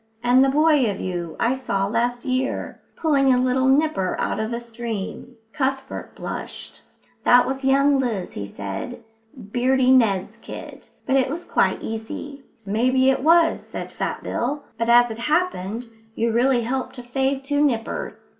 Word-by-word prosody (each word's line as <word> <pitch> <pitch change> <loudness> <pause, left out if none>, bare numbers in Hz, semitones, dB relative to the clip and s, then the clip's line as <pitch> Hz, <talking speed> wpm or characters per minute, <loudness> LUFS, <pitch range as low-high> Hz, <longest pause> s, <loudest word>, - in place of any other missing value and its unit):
And 250 +2 +5
the 270 - +3
boy 295 -3 +4
of 200 - -4
you 175 -3 -4
I 235 - +2
saw 200 -7 -1
last 240 +4 -1
year, 260 0 -2
pulling 280 -4 +3
a 250 - +4
little 255 +1 +2
nipper 270 -9 +2
out - - -1
of 220 +1 -2
a 235 - -2
stream." 235 0 -6 0.2
Cuthbert 270 -2 -3
blushed. - - -7 0.4
"That 245 0 +6
was 270 +1 -3
young 275 +1 +4
Liz," 225 -8 -2
he 100 -1 -5
said, 100 - -6 0.5
"Beardy 255 +1 +3
Ned's 210 -7 +3
kid, - - -10 0.2
but 270 0 +2
it 260 -1 +2
was 335 +5 -5
quite - - +1
easy." 225 +6 -6 0.2
"Maybe 255 +6 +3
it 265 - -1
was," 330 +1 +4
said - - -7
Fat - - -4
Bill, 280 +4 -2
"but, 230 +1 -2
as 240 0 +6
it 220 - -7
happened, 240 - -1 0.3
you 230 0 0
really 245 +2 +3
helped 255 +3 -3
to 245 - -8
save 270 +2 -1
two 285 +1 +1
nippers. 230 -6 -2
250 Hz, 165 wpm, -23 LUFS, 230-270 Hz, 0.5 s, That